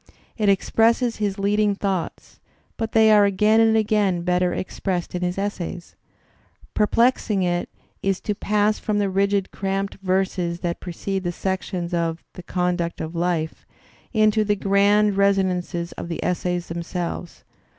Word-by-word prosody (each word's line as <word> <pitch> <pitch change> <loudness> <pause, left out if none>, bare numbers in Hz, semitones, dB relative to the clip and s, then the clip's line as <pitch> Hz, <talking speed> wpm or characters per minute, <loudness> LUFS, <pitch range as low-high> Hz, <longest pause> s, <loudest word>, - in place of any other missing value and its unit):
It 210 -3 +1
expresses 230 +4 +2
his 205 -2 -1
leading 205 +1 +1
thoughts, 195 -4 -4 0.4
but 225 0 -4
they 220 -1 +6
are 210 -1 +6
again 210 +3 +3
and 225 0 +4
again 205 -5 +1
better 180 0 +1
expressed 185 -1 -3
in 180 - -3
his 180 +1 -1
essays. 185 -3 -4 0.8
Perplexing 215 -2 +2
it 175 -1 -1 0.3
is 195 -1 0
to 210 - -1
pass 210 +1 +1
from 215 -2 -1
the 200 -2 0
rigid 195 0 +1
cramped 195 0 -3
verses 185 -2 -1
that 170 -1 -2
precede 190 +2 -4
the 175 - -1
sections 185 -1 -3
of 165 -1 -1
"The 180 - -9
Conduct 180 -1 -2
of 160 +1 -5
Life" 170 -2 -2 0.4
into 215 -1 +3
the 205 0 +1
grand 200 +1 +3
resonances 185 -3 +1
of - - -7
the 165 - -4
essays 180 -1 -1
themselves. 170 +1 -5
195 Hz, 145 wpm, -23 LUFS, 175-210 Hz, 0.8 s, they